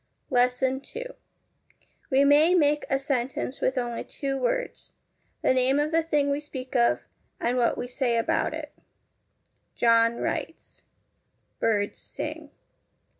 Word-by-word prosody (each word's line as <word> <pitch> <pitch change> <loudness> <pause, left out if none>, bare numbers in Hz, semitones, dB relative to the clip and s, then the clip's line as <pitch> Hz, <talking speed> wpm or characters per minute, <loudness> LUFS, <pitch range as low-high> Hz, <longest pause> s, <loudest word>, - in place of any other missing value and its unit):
LESSON 250 +1 +2
II - - -5 1.0
We 275 0 +4
may 300 +5 +5
make 295 -3 +3
a 270 - +2
sentence 270 -1 -2
with 260 - +1
only 240 -2 -2
two 275 -1 -4
words 270 - -2 0.5
the - - +4
name 260 +2 +3
of 300 +1 0
the 330 0 +3
thing 295 -3 +1
we 280 - 0
speak 265 -3 -8
of 235 -1 +3 0.3
and 240 +1 0
what 245 -2 +2
we 245 - -3
say 245 -2 0
about 230 - +1
it: - - -7 1.0
John 230 0 +4
writes. - - -5 0.8
Birds 205 -2 0
sing. - - -6
265 Hz, 130 wpm, -26 LUFS, 245-290 Hz, 1.0 s, may